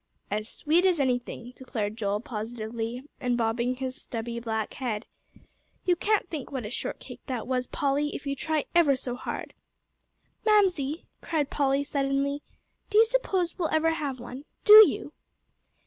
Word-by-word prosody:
"As 215 +2 -2
sweet 325 +4 +2
as 365 -4 +3
anything," 245 -2 -1
declared 215 -5 -3
Joel, 205 -2 -1
positively, 230 +1 -5 0.2
and 245 -1 0
bobbing 235 +2 0
his 260 0 -4
stubby 235 0 -4
black 220 -2 -2
head. 235 -5 -3 0.8
"You 360 - +4
can't 415 +2 +1
think 305 -7 -6
what 260 -5 -3
a 210 - -5
shortcake - - -5
that 250 -5 -3
was, 250 -1 -1
Polly, 285 +1 0
if 285 - -7
you 280 0 -1
try 310 +1 -1
ever 320 -5 +5
so 250 -1 -4
hard." 245 - -5 0.9
"Mamsie," 360 -9 +2 0.2
cried 300 -4 -1
Polly, 275 -1 +2
suddenly, 280 0 0 0.5
"do 420 - +2
you 445 - +8
suppose 385 -8 0
we'll 330 - +1
ever 320 +1 +3
have 285 -5 -3
one? 250 +4 -8 0.2
Do 420 - +9 0.2
you?" - - -6
270 Hz, 155 wpm, -27 LUFS, 240-315 Hz, 0.9 s, Do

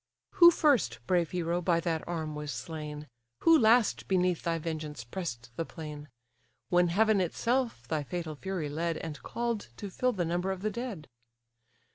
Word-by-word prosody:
Who 345 -1 +9
first, 295 - +3
brave 175 0 +2
hero! 175 0 -1
by 170 -1 +2
that 165 -2 -1
arm 160 -3 -3
was 150 -1 -5
slain, 150 +4 -6 0.3
Who 330 - +7
last 230 -4 +4
beneath 180 -2 +2
thy 165 -1 0
vengeance 155 -4 -5
press'd 120 -3 -6
the - - 0
plain; 150 -3 -8 0.6
When 175 0 +4
heaven 210 +3 +3
itself 230 - -1
thy 155 +2 0
fatal 165 +2 -4
fury 185 0 -3
led, 165 +3 -2
And 155 -3 -6
call'd 235 -2 -3
to 200 - -6
fill 250 +6 +1
the 180 -5 -1
number 175 +3 -1
of 190 0 -5
the 215 - 0
dead? 215 -8 -5
170 Hz, 165 wpm, -30 LUFS, 155-200 Hz, 0.6 s, Who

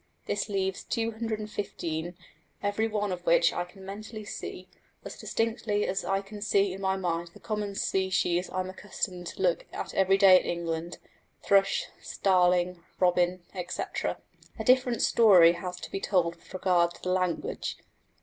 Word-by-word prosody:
This - - -2
leaves 190 -1 -1
215, 215 -7 -3 0.5
every 205 +2 +1
one 210 -2 -1
of 180 -1 -4
which 170 0 +5
I 175 - -2
can 190 +2 -14
mentally 215 +2 -7
see 185 -2 -7 0.4
as - - -7
distinctly 225 -2 -1
as 190 - -1
I 195 +1 0 0.2
see 200 -2 +2
in 195 - -8
my 190 0 +1
mind 175 -2 -2
the - - -12
common 210 -2 -3
species 185 -2 0
I 185 - -1
am 185 - -5
accustomed 185 -2 -5
to - - -7
look - - +1
at - - -5
every 195 0 +4
day 190 -2 +8
in - - -7
England 170 0 -3 0.5
thrush, 195 0 +3 0.2
starling, 180 -2 +2 0.2
robin, 180 0 +2
etc. 180 -2 -3 0.4
A - - -3
different 255 -2 +3
story 185 -7 +7
has 180 +1 -6
to - - -8
be - - -2
told 175 -4 +1
with 170 - -21
regard 175 -2 +2
to - - -17
the 180 - -1
language. 185 - -1
190 Hz, 160 wpm, -28 LUFS, 180-205 Hz, 0.5 s, day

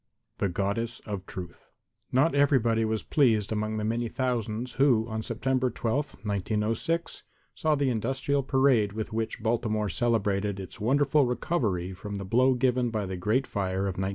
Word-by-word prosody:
The 100 - +1
Goddess 100 +6 -2
of 100 -3 -6
Truth 90 -2 -9 0.4
Not 135 +6 +3
everybody 125 -5 +3
was 110 0 -1
pleased 115 -9 +2
among 110 0 -1
the 105 - -2
many 115 +2 0
thousands 120 -1 -2
who 120 -5 +4
on 110 -1 -3
September 130 +3 0
12, 135 +2 -3
1906, 105 - -1 0.3
saw 155 -1 +1
the 140 -2 +1
industrial 135 +5 0
parade 130 -6 +3
with 110 0 -4
which 110 0 -3
Baltimore 110 -2 0
celebrated 100 -2 0
its 95 +1 -8
wonderful 140 +4 +3
recovery 105 - -1
from 105 +2 -7
the 100 -1 -5
blow 130 +6 +3
given 125 -1 +1
by 110 -3 -2
the 95 0 -4
great 105 +9 +1
fire 95 -3 -2
of 100 - 0
1904. 95 +1 -2
115 Hz, 160 wpm, -28 LUFS, 105-130 Hz, 0.4 s, who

